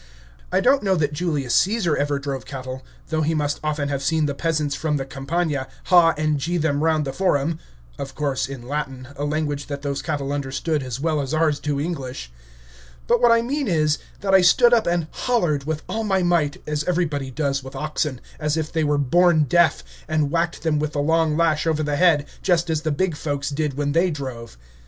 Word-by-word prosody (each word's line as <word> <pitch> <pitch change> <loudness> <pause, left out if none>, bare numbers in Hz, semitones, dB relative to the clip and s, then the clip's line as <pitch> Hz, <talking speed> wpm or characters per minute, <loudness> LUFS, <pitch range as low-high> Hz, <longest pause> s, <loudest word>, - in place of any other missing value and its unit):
I - - +2
don't 270 +2 +4
know 195 -2 +2
that 150 -3 0
Julius 150 -6 -1
Caesar 195 -6 +2
ever 145 0 0
drove 140 -1 -4
cattle, 130 -1 -7 0.3
though 160 0 0
he 160 +1 +1
must 145 -1 -1
often 150 -2 -1
have 140 -1 -2
seen 160 +2 +1
the 145 - -1
peasants 150 -1 -1
from 150 -1 -1
the 135 - -3
Campagna 140 +1 -2 0.2
"haw" 170 -2 +5
and 155 -1 0
"gee" 175 +5 -1
them 150 -2 0
round 160 -2 +2
the 135 - -4
Forum 160 -2 0 0.4
(of 135 -1 -6
course 135 -3 -1
in 125 -3 -8
Latin, 135 -3 -4
a 145 - -3
language 145 -1 -2
that 140 -1 -5
those 140 -1 -2
cattle 140 -1 -2
understood 145 +2 -2
as 130 -1 -5
well 155 0 0
as 140 +2 -2
ours 155 -2 +2
do 145 -2 -2
English); 135 - -4 0.7
but - - +2
what 240 - +6
I 230 0 +4
mean 280 +2 -2
is, 155 -4 +2 0.2
that 195 -1 0
I 190 - +7
stood 240 +7 +5
up 230 -2 +3
and 170 -1 +1
"hollered" 175 - 0
with 155 0 -3
all 225 0 -2
my 190 -3 +1
might, 170 -5 +1
as 150 0 -1
everybody 155 -7 -1
does 140 0 -1
with 130 - -10
oxen, 150 -3 -2 0.2
as 150 0 0
if 155 -1 -3
they 160 -1 +1
were 145 -1 +2
born 165 +3 +4
deaf, 170 +4 +3 0.2
and 155 -2 0
whacked 170 0 -1
them 155 -2 +1
with 150 0 -2
the 145 - -1
long 160 +1 +2
lash 165 -1 +2
over 155 -1 +1
the 145 -1 -1
head, 160 -5 +4 0.2
just 170 -2 +1
as 155 -1 0
the 155 -1 -1
big 175 +2 0
folks 145 -1 -3
did 145 -1 -2
when 145 -1 0
they 170 +5 +3
drove. 130 - -6
150 Hz, 210 wpm, -22 LUFS, 140-165 Hz, 0.7 s, I